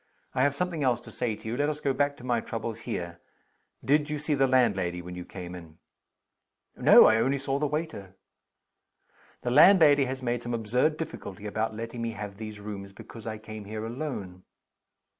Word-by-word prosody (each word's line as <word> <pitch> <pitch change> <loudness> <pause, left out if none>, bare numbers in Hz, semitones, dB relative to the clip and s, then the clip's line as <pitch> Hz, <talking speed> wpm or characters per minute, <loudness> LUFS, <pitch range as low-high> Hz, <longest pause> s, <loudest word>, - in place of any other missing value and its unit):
I 130 - +1
have 140 +1 +3
something 175 -2 -2
else 125 -3 +2
to - - -12
say 115 -3 -2
to 110 - -11
you. 115 - -2
Let 145 +3 +1
us 150 -1 -3
go 140 -2 0
back 145 +1 0
to 125 - -13
my 120 -2 +1
troubles 115 0 -5
here. 85 -1 -4 0.7
Did 150 +2 +3
you 150 - -2
see 150 +1 -1
the 135 -1 +3
landlady 95 -9 +2
when 90 +1 -8
you 90 0 -6
came 90 -1 -8
in?" 85 -3 -11 1.0
"No. - - +8
I 110 - +5
only 135 +5 +2
saw 135 0 -2
the 150 - +1
waiter." 150 - -4 1.3
"The 120 - -1
landlady 150 -2 +7
has 130 0 -5
made 120 -1 -1
some 120 0 -3
absurd 125 +8 +1
difficulty 105 - -7
about 110 +1 -2
letting 115 +1 -6
me 115 -1 -2
have 100 -2 -7
these 110 -1 -7
rooms 100 -1 -7
because 115 +2 -11
I 110 -1 -3
came 110 -1 -9
here 110 +1 -5
alone." 115 -8 -5
115 Hz, 195 wpm, -28 LUFS, 105-140 Hz, 1.3 s, No